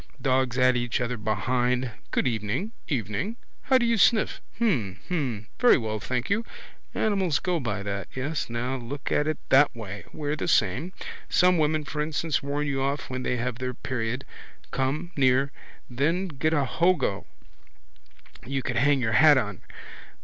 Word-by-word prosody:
Dogs 130 -1 +1
at 130 0 +4
each 120 -1 0
other 125 0 -1
behind. 120 +4 0 0.2
Good - - +1
evening. 115 - -2 0.2
Evening. 130 - -2 0.3
How 260 - +4
do 240 - +2
you 230 -2 +2
sniff? 220 +3 +3 0.2
Hm. 125 - 0
Hm. 130 - -2
Very 245 - +6
well, 110 -4 -3
thank 125 +2 -2
you. 225 +3 +1 0.5
Animals 190 -8 +1
go 180 -2 -1
by 105 -7 -3
that. 100 0 -4
Yes 135 +1 -2
now, 125 +3 -2
look 130 +3 -6
at 150 - +2
it 155 - 0
that 140 -1 +5
way. 105 -3 -7
We're 150 0 -2
the - - -3
same. 165 +8 +2 0.4
Some 180 -1 +4
women, 155 0 +1
instance, 150 +1 -1
warn 145 +1 -2
you 135 -2 -1
off 140 0 -2
when 130 0 -3
they 125 0 -1
have 120 0 -3
their 125 -1 -3
period. 120 0 -3 0.5
Come 145 +6 -1
near. 135 0 +3 0.4
Then 165 +9 0
get 155 +1 0
a 145 -4 +2
hogo 170 - +1 1.2
you 135 +3 -3
could 120 -2 -2
hang 140 -1 +3
your 110 -2 0
hat 150 +4 +7
on. 105 -7 -2
130 Hz, 165 wpm, -26 LUFS, 120-155 Hz, 1.2 s, hat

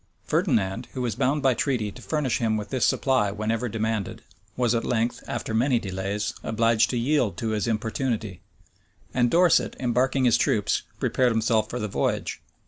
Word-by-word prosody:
Ferdinand, 100 +4 0
who 130 - -3
was 120 -3 -1
bound 145 +3 0
by 135 -1 +4
treaty 115 -4 -1
to 125 - -13
furnish 130 +5 -1
him 110 -2 +1
with 105 0 -5
this 130 -3 +1
supply 130 -7 +2
whenever 110 +4 -2
demanded, 110 -1 -3 0.3
was 120 -2 +2
at 115 - 0
length, 120 0 -1
after 115 -1 -4
many 125 +3 +3
delays, 100 0 -3
obliged 115 0 +2
to 125 - -1
yield 120 - +1
to 115 - -2
his 110 +1 -1
importunity; 110 -3 -2 0.7
and 120 -1 +2
Dorset, 175 +3 +3
embarking 130 +2 +1
his 120 - +5
troops, 105 - +1 0.2
prepared 125 -1 +2
himself 115 0 +1
for 125 - -4
the 105 - -2
voyage. 100 - -2
115 Hz, 170 wpm, -25 LUFS, 110-125 Hz, 0.7 s, his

